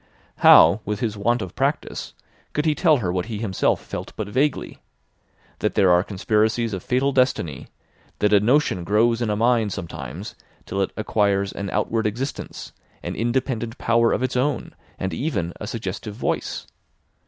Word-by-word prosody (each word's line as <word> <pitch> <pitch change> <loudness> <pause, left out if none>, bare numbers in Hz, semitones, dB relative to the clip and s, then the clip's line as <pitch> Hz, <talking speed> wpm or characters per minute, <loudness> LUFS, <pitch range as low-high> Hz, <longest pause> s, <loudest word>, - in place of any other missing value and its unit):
How - - +7
with 105 0 -3
his 110 -3 -2
want 115 +3 +1
of 90 - -8
practice - - -2 0.4
could 150 - 0
he 155 - +3
tell 155 -1 +4
her 90 -8 -2
what 90 +2 -2
he 110 -3 -4
himself 105 -4 0
felt - - -6
but 110 - -4
vaguely: 135 +7 -1 0.8
that - - -1
there 95 -2 +5
are 90 0 +5
conspiracies 110 +3 0
of 95 - -3
fatal 130 +6 +1
destiny, 125 - 0 0.5
that 105 0 +2
a 100 - +7
notion 120 -4 +2
grows 115 +5 +2
in 115 - 0
a 105 - +1
mind 115 -2 +2
sometimes 85 - -7 0.3
till 100 - -2
it 95 - 0
acquires 100 -2 +1
an 100 -1 -4
outward 110 +3 0
existence, 125 +7 -5 0.3
an - - -4
independent 120 0 -1
power 115 0 +2
of - - 0
its 130 0 -1
own, 135 +2 -1 0.2
and 95 - -3
even 105 - -2
a 105 - -4
suggestive 110 -2 -5
voice? - - -2
110 Hz, 165 wpm, -23 LUFS, 100-125 Hz, 0.8 s, How